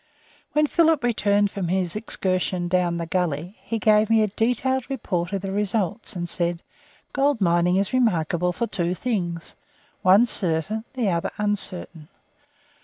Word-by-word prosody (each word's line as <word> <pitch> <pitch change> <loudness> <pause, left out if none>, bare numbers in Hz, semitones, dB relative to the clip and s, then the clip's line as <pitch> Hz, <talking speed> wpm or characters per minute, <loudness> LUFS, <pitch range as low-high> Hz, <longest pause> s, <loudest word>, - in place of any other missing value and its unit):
When 300 0 +4
Philip 320 -2 +3
returned 205 -4 +2
from 190 -3 -3
his 180 0 -1
excursion 185 -4 -1
down 175 -1 +1
the 170 - -3
gully, 175 +1 -2
he 230 - -3
gave 215 -1 +3
me 225 -1 +4
a - - +2
detailed 250 +5 0
report 180 -10 -2
of 195 -1 -3
the 195 - -3
results 205 +1 -1
and 175 -1 -3
said, 170 0 -2 0.5
"Gold 280 -2 +2
mining 175 -1 +3
is 195 +3 0
remarkable 180 -7 +1
for 205 +7 -2
two 180 -5 -2
things, 175 -8 -3 0.5
one 195 +6 +6
certain, 200 +1 -1
the 235 -6 +1
other 170 -2 0
uncertain. 185 -6 -3
195 Hz, 150 wpm, -24 LUFS, 175-225 Hz, 0.5 s, one